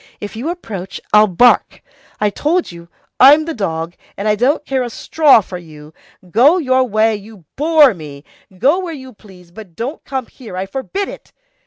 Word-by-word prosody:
If 205 +1 -7
you 250 +9 -4
approach, 195 - -7
I'll 210 0 +6
bark. 225 +6 +2 0.4
I 210 -1 +1
told 325 - -1
you, 170 0 -13 0.3
I'm 295 +4 +7
the 330 - -4
dog, 165 - -3 0.2
and 200 - -3
I 210 - +3
don't 260 +8 0
care 265 -1 -1
a 245 - -3
straw 285 +1 +3
for 180 -2 -8
you. 155 -2 -14 0.4
Go 275 - +5
your 260 -6 +2
way, 220 -1 +1
you 205 -3 -13
bore 300 -3 +4
me! 145 -5 -11 0.3
Go 280 - +2
where 350 -4 -5
you 260 -2 -11
please, 185 -5 -18
but 185 -3 -13
don't 255 - -5
come 265 -2 -4
here, 225 -9 -11
I 190 - -2
forbid 270 - -4
it! - - -12
225 Hz, 185 wpm, -16 LUFS, 190-280 Hz, 0.4 s, I'm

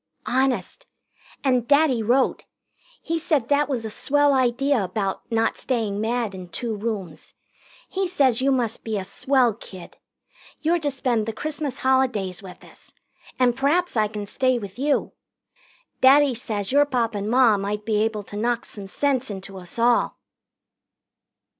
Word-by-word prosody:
"Honest. 265 - -1 0.6
And 250 -4 +1
Daddy 285 -4 +4
wrote. 245 +5 +1 0.6
He 330 0 -1
says 310 -5 +1
that 290 +1 +2
was 245 -5 -2
a 220 - -4
swell 290 +5 +2
idea 260 -1 +2
about 195 +4 -3
not 225 0 +1
staying 215 -5 -1
mad 230 -2 -1
in 185 -2 -9
two 225 +6 -3
rooms. 200 -7 -5 0.5
He 385 0 -2
says 270 -9 +2
you 275 +1 +2
must 240 -4 -1
be 220 -2 -2
a 195 - -3
swell 250 +4 +1
kid. 185 -4 -12 0.6
You're 340 +2 +1
to 295 -2 -1
spend 245 -5 -1
the 225 - -2
Christmas 295 +2 -4
holidays 250 -8 +1
with 190 -2 -12
us - - -15 0.4
and 245 -2 +3
p'raps 295 +6 +1
I 215 -2 +3
can 210 -1 -6
stay 255 +4 +1
with 200 0 -8
you. 285 +1 +1 0.9
Daddy 275 +1 +6
says 215 -4 -3
your 290 +2 +5
Pop 240 -5 -1
and 205 0 -3
Ma 245 -2 +5
might 205 +1 -3
be 220 -2 +1
able 215 -1 -1
to 205 - -11
knock 235 +2 -1
some 200 -2 -8
sense 265 +3 0
into 195 -1 -8
us 180 +3 -12
all." 235 +1 +2
240 Hz, 160 wpm, -23 LUFS, 210-270 Hz, 0.9 s, Daddy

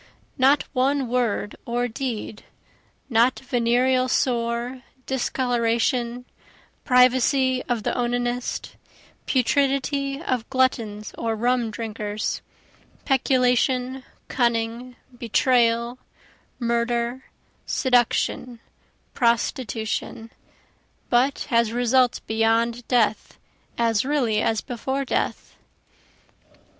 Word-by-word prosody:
Not 275 +2 +4
one 270 0 +1
word 230 -4 -1
or 240 +1 -1
deed, 235 -3 -5 0.6
not 240 0 +3
venereal 255 +1 +1
sore, 240 0 -1 0.2
discoloration, 245 -1 0 0.6
privacy 255 +1 +3
of 235 -3 -1
the - - 0
onanist, 245 0 -2 0.5
Putridity 275 +1 +1
of 255 -8 -2
gluttons 230 -5 0
or 225 -1 -1
rum 240 +1 +1
drinkers, 215 -1 -4 0.6
peculation, 255 -1 +1 0.2
cunning, 235 0 -1 0.2
betrayal, 235 0 +1 0.6
murder, 235 +1 -1 0.4
seduction, 245 -1 +1 0.5
prostitution, 230 -1 -1 0.8
But 260 +3 +2
has 230 -2 +3
results 245 +1 +2
beyond 230 +2 0
death 230 -4 +1 0.4
as 230 -2 +2
really 255 -6 +1
as 220 -1 0
before 265 +3 -3
death. - - -2
245 Hz, 80 wpm, -23 LUFS, 230-260 Hz, 0.8 s, Not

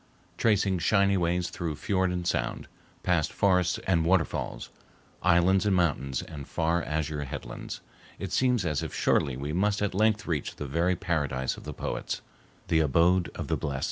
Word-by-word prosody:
Tracing 100 -4 +2
shining 100 +1 +3
ways 85 0 0
through 80 -3 -3
fiord 95 +4 0
and 90 -1 -3
sound, - - -1 0.4
past 85 -4 +1
forests 90 -3 +2
and 85 -3 +2
waterfalls, 85 +1 0 0.5
islands 90 +3 +4
and 100 - +3
mountains 70 -7 0
and 70 -4 -9
far 85 +1 0
azure 75 -2 -2
headlands, - - -7 0.4
it - - -5
seems 125 -6 +2
as 75 -4 0
if - - -5
surely 65 -3 +2
we 70 +3 -4
must 100 +4 +1
at 105 -1 -1
length 110 +2 +2
reach 75 -5 -2
the 75 - -5
very 85 +6 +1
paradise 75 -8 -1
of - - -12
the - - -5
poets, - - -4 0.5
the 80 - +3
abode 85 +4 +3
of - - -5
the - - +1
blessed. 70 -2 -3
85 Hz, 170 wpm, -28 LUFS, 75-95 Hz, 0.5 s, islands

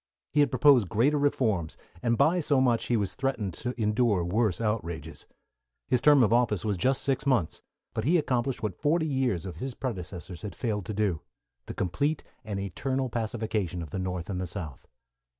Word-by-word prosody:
He 150 - +1
had 145 - +5
proposed 130 - +5
greater 140 +7 +2
reforms, 110 - 0 0.2
and 115 -1 +1
by 175 +8 +4
so 145 -4 +2
much 120 -3 +2
he 120 - +2
was 100 -3 -1
threatened 130 -8 -2
to 125 +5 -5
endure 105 -3 +2
worse 105 +1 +1
outrages. 105 -7 -3 0.6
His 125 -2 +2
term 145 -3 +6
of 110 - +3
office 110 -6 +2
was 105 -2 +1
just 130 +9 +1
six 135 -2 0
months, 120 - +1 0.3
but 110 - -2
he 165 +8 +4
accomplished 130 -5 -1
what 105 -4 -3
forty 160 +2 +2
years 130 - 0
of 90 - -7
his 130 -1 -5
predecessors 90 - -6
had 105 - -6
failed 105 -6 -2
to - - -3
do 100 -6 0 0.5
the - - -6
complete 140 - -1 0.2
and 105 -2 -4
eternal 130 +8 -2
pacification 110 -6 -2
of 75 - -10
the 95 - -3
North 90 -2 -3
and 95 -2 -3
the 90 - -3
South. 85 -6 -7
110 Hz, 185 wpm, -28 LUFS, 95-130 Hz, 0.6 s, term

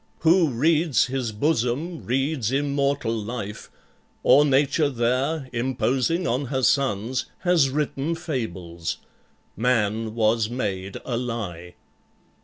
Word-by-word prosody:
Who 165 0 +4
reads 155 +3 +2
his 130 -3 -2
bosom 145 +6 -1
reads 135 -1 0
immortal 140 -3 0
life, 105 -1 -5 0.5
Or 145 - +6
nature 145 +1 +2
there, 130 +4 0
imposing 130 +7 0
on 130 +1 0
her 130 +1 -2
sons, 125 -2 +1
Has 175 -7 +3
written 150 +2 -1
fables; 95 - -4 0.6
man 110 -1 0
was 110 -1 +2
made 100 -6 -3
a 120 - -2
lie." 100 -8 -5
130 Hz, 105 wpm, -24 LUFS, 115-145 Hz, 0.6 s, Or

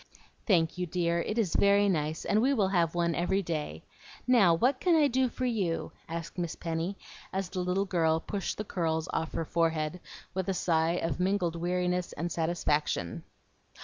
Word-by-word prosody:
"Thank 170 -4 +2
you, 180 - -1
dear, 170 0 0
it 215 - -3
is 210 -7 +1
very 200 0 +4
nice, 155 -4 -1
and 215 - +2
we 275 +3 +3
will 200 -5 +2
have 175 -3 +1
one 170 -1 +1
every 190 +4 0
day. 150 - -4 0.4
Now, 215 -9 +5
what 255 +9 +2
can 350 0 +3
I 305 -2 +5
do 260 -1 +1
for 255 - -3
you?" 200 -9 -1 0.2
asked 165 +2 -5
Miss 170 -2 -2
Penny, 165 +4 -3 0.3
as 190 -1 -2
the 185 - -4
little 180 +2 0
girl 160 -4 +2
pushed 195 +3 -4
the 210 - -2
curls 160 -4 -1
off 160 - -2
her 165 - -2
forehead, 165 0 0 0.3
with 190 0 -2
a 190 - 0
sigh 165 -1 +2
of 165 -3 -2
mingled 180 -2 +1
weariness 180 +1 -1
and 170 +2 -3
satisfaction. 155 - -1
175 Hz, 180 wpm, -29 LUFS, 165-195 Hz, 0.4 s, Now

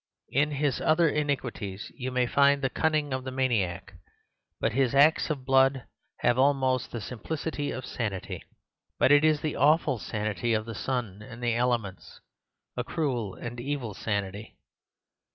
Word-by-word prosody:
In 145 +3 +2
his 140 -2 0
other 165 +2 +4
iniquities 125 -10 -2
you 130 -1 -4
may 125 -1 +1
find 140 +2 +3
the 135 - +1
cunning 155 -3 0
of 130 0 -2
the 130 - -4
maniac; 100 -8 -1 0.7
but - - +1
his 135 0 +1
acts 150 +5 +5
of 140 -4 -3
blood 135 -1 +4 0.4
have 120 +1 +3
almost 130 -2 +2
the 120 - -5
simplicity 145 +6 -4
of 130 - -5
sanity. 105 -6 -4 0.5
But - - +4
it 145 +1 +6
is 155 -1 +3
the 155 - -2
awful 145 -4 +3
sanity 110 +4 -1
of 110 0 -1
the 115 - -6
sun 110 -4 -3
and 120 +2 -10
the 120 -1 +2
elements—a 115 -7 -4
cruel, 125 - -2
an 120 0 -7
evil 130 -4 -3
sanity. 100 0 -4
130 Hz, 150 wpm, -28 LUFS, 115-145 Hz, 0.7 s, it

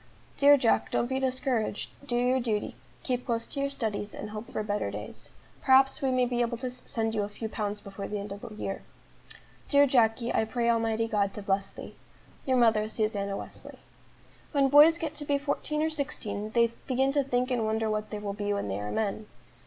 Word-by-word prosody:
"Dear 285 0 +7
Jack, 245 -4 +2
don't - - +1
be 265 +2 -1
discouraged; 255 -5 -1 0.2
do 240 - -1
your 250 +2 +2
duty; 220 -4 -2 0.3
keep 250 -2 -1
close 230 -1 -1
to 280 - -6
your 280 0 0
studies, 215 -6 -3
and 210 - -6
hope 215 +1 -7
for 215 - -2
better 205 0 -1
days. - - -8 0.3
Perhaps 270 +2 +5
we 270 - +1
may 255 -1 +2
be 245 0 -1
able 235 0 0
to 250 +1 -4
send 225 -3 -3
you 215 - 0
a 205 - -3
few 220 +2 -5
pounds 210 -1 -3
before 200 0 -7
the 210 - -3
end 200 0 -6
of 200 +1 -7
the - - -8
year. 195 -2 -4 0.9
"Dear 285 0 +6
Jacky, 235 -2 +2
I - - +2
pray 235 +1 +1
Almighty 225 -1 +1
God 200 -3 0
to 210 - -6
bless 195 0 0
thee! - - -10 0.5
"Your 260 -1 +3
mother, 220 -3 +3
"SUSANNA 205 -3 -1
WESLEY." - - -9 0.8
When 275 -2 +3
boys 300 +4 +8
get 320 -3 -4
to 305 - -4
be 285 -1 +1
fourteen 290 +2 -2
or 320 - 0
sixteen, 270 -8 -3
they 235 0 +3 0.2
begin 265 +1 +2
to 285 0 +2
think 255 -1 0
and 240 -3 +1
wonder 220 0 0
what 215 0 -2
they 210 - -4
will 205 -1 -4
be 205 0 -2
when 200 - -2
they 95 +1 -2
are 105 0 -4
men. 215 - -2
230 Hz, 215 wpm, -28 LUFS, 210-260 Hz, 0.9 s, boys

